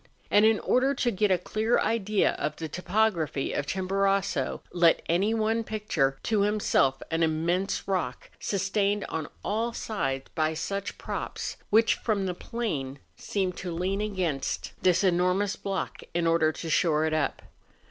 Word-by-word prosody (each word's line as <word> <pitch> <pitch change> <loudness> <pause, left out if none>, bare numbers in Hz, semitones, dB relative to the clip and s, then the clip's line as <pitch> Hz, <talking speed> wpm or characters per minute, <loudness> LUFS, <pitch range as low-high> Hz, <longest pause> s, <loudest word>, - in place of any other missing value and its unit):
And 205 +1 +6
in 220 -1 +4
order 265 +2 +2
to 245 -2 +1
get 210 0 +1
a 185 - +4
clear 215 +6 0
idea 215 -2 +2
of 150 - -2
the 160 - -5
topography 180 -3 0
of 145 - -2
Chimborazo, 195 +1 0
let 170 -2 +4
any 190 +6 +2
one 225 +1 +1
picture 190 -12 0
to 215 -2 +1
himself 200 -10 +2
an 165 +1 0
immense 165 +4 0
rock, 180 -10 -2
sustained 200 +1 0
on 160 -2 -3 0.2
all 230 +3 -1
sides 135 -15 -2
by 155 0 0
such 200 +5 -3
props, - - -4
which 220 +2 +5
from 205 -4 -1
the 180 - -1
plain 155 - -4 0.2
seem 190 -3 -1
to 180 0 -5
lean 185 +4 -1
against 185 -10 -2
this 185 +2 +3
enormous 185 +2 +2
block 195 -1 -4
in 175 -1 +1
order 165 -1 +3
to 165 - -7
shore 155 -1 +2
it 160 - 0
up. 155 -2 -1
190 Hz, 155 wpm, -27 LUFS, 165-210 Hz, 0.2 s, And